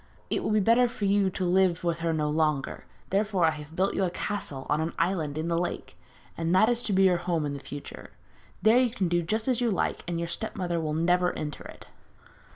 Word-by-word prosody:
It - - +1
will - - -1
be 215 0 +3
better 230 +5 +4
for 215 -3 -4
you 200 -1 +3
to 185 0 -3
live 180 -1 +2
with 170 -1 0
her 165 0 0
no 155 -2 0
longer; 150 -2 -1 0.3
therefore 200 -3 +2
I 160 - +4
have 150 +1 -9
built 190 +3 +1
you - - 0
a 185 - +1
castle 175 -8 -4
on 150 - +1
the 165 - -2
island 165 -4 0
in 160 +1 -2
the 170 0 +1
lake, 175 - -4 0.4
and 165 +2 0
that 215 +5 +5
is 240 -1 +1
to - - +1
be 190 +1 +4
your 185 -2 +4
home 170 -3 -1
in 140 -1 -4
future. 145 +1 -9 0.5
There 220 +4 +6
you 255 -1 +3
can 200 -6 -1
do 175 0 +2
just 220 +7 -2
as 250 -2 +1
you 240 - +2
like, 195 - -1
and 175 -1 -2
your 170 0 -2
step 220 +6 -5
mother 175 -3 -1
will 155 -1 -2
never 180 +2 +2
enter 150 -2 -5
it.' - - -11
175 Hz, 240 wpm, -27 LUFS, 160-200 Hz, 0.5 s, There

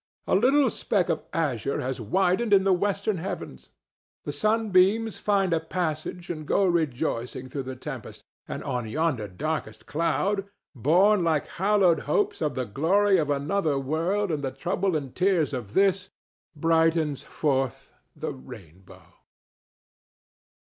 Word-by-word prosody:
A - - -1
little 260 +5 +4
speck 185 -4 0
of 165 - 0
azure 140 -5 -1
has 130 -1 -3
widened 190 - +1
in 195 -1 +6
the 195 -1 +4
western 200 +2 0
heavens; 175 +4 -6 0.5
the - - -4
sunbeams 215 0 +2
find 195 -4 +1
a 165 - +2
passage 165 +1 -3
and 155 -3 -6
go 200 - +3
rejoicing 135 -7 -1
through 135 +2 -4
the 130 - -5
tempest, - - -8 0.2
and - - -5
on 125 -2 -3
yonder 140 -5 -1
darkest 110 - -4
cloud, 195 +5 0 0.3
born 180 - +3
like 160 -3 +1
hallowed 190 -4 +2
hopes 415 - 0
of 150 - -1
the 130 - -2
glory 190 - +2
of 150 -2 -1
another 145 +2 0
world 165 +8 -1
and 150 -2 -2
the 135 - 0
trouble 175 +7 -1
and 140 -4 -3
tears 180 -5 +1
of 120 -6 -5
this, 195 -1 +2 0.5
brightens 160 -2 +2
forth 135 -4 -2 0.2
the - - -4
rainbow. 85 +7 -13
165 Hz, 140 wpm, -26 LUFS, 140-195 Hz, 0.5 s, in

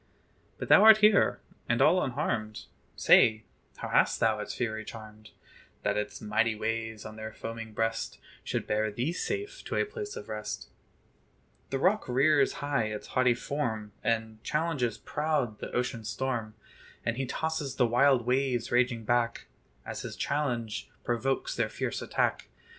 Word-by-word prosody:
But - - -5
thou 205 - +8
art 220 0 +10
here, 210 -1 +4 0.3
and 115 0 +2
all 160 +7 +5
unharmed! 120 -5 -2 0.3
Say, 110 -1 +5 0.3
how - - -5
hast - - +3
thou 110 -1 +2
its 105 - -5
fury 110 -2 -2
charmed, 110 -1 -11 0.5
That - - +1
its 105 - -3
mighty 110 +1 +1
waves 110 0 -3
on 110 0 -8
their 110 0 -6
foaming 115 0 -7
breast 115 0 -1 0.3
Should - - -2
bear 110 +1 0
thee 125 +10 -1
safe 410 - -4
to - - -3
a - - +2
place 420 -1 -6
of - - -8
rest? 105 -1 -5 1.0
The 135 - -1
rock 190 +7 +2
rears 140 +2 +4
high 140 -6 +1
his 105 -1 -5
haughty 125 -1 +4
form, 115 -6 -3
And 110 -2 -1
challenges 150 -8 -1
proud 150 -8 -1
the - - -6
ocean 125 -2 -2
storm; 110 0 -3 0.5
And 120 0 -1
he 135 -1 -2
tosses 160 -3 -2
the 125 - +3
wild 125 +1 +4
waves 125 -1 0
raging 120 -1 +2
back, 120 0 0 0.4
As - - -5
his - - -6
challenge 125 -7 -2
provokes 130 +3 -1
their - - 0
fierce - - -3
attack. - - -1
120 Hz, 155 wpm, -29 LUFS, 110-140 Hz, 1.0 s, art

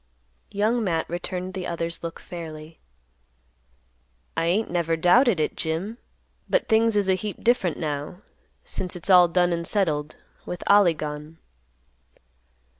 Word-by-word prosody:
Young 220 +4 +1
Matt 165 -5 0
returned 180 +2 -4
the 185 -1 -4
other's 170 0 -4
look 170 -1 -6
fairly; 160 -2 -9 1.6
"I 165 - 0
ain't 200 +5 +1
never 165 -2 0
doubted 205 - +4
it, 155 - 0
Jim. 180 +9 -3 0.5
But - - +1
things 225 0 +3
is 205 -2 +2
a 190 - +4
heap 205 +2 -4
different 220 -9 +2
now, 155 +4 -4 0.4
since 180 -1 -5
it's 180 +2 -2
all 180 -1 +8
done 175 0 +2
and 170 0 -3
settled, 155 -7 0 0.3
with 180 - -6
Ollie 200 -5 +5
gone." 150 +1 -6
175 Hz, 135 wpm, -25 LUFS, 165-200 Hz, 1.6 s, all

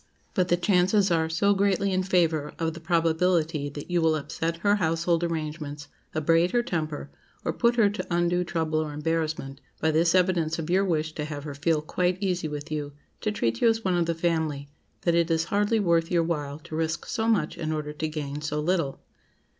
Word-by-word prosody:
But 180 -1 +2
the 175 - +3
chances 190 +2 +3
are 160 -1 +2
so 200 +5 +3
greatly 200 0 +1
in 185 - +2
favor 165 -5 +1
of 165 -1 -1
the 170 - -8
probability 165 -2 +1
that 145 +4 -8
you 175 -1 +2
will 160 -1 +3
upset 165 +2 -3
her 205 +1 +5
household 170 -1 +1
arrangements, 155 -3 -4 0.3
abrade 165 +3 +3
her 240 -1 +3
temper, 155 -8 -3 0.3
or - - 0
put 235 0 +2
her 225 -4 +5
to 205 +1 -3
undue 175 0 +1
trouble 160 -2 -1
or 155 -1 -3
embarrassment, 155 -3 -2 0.2
by 160 - +2
this 170 +3 +3
evidence 175 -3 +2
of 165 0 -4
your 190 +2 +4
wish 160 -4 0
to 150 - -4
have 145 -2 -6
her 145 -1 -5
feel 150 +2 0
quite 180 +3 0
easy 180 -5 -1
with 150 +1 -6
you, 145 -2 -3 0.3
to 215 - -1
treat 115 - -1
you - - +6
as 225 -1 -1
one 185 -1 +2
of 170 -1 +1
the 170 - 0
family, 160 -4 -1 0.3
that 170 - +2
it 170 0 +2
is 165 0 +2
hardly 205 +5 +1
worth 170 -4 +2
your 170 -1 +2
while 145 -4 -2
to 155 0 -9
risk 160 +1 -1
so 225 -1 -1
much 205 -9 +1
in 160 -2 -3
order 150 -1 -3
to 155 +1 -2
gain 150 -2 -4
so 150 0 -2
little. 160 -3 0
165 Hz, 210 wpm, -26 LUFS, 155-180 Hz, 0.3 s, you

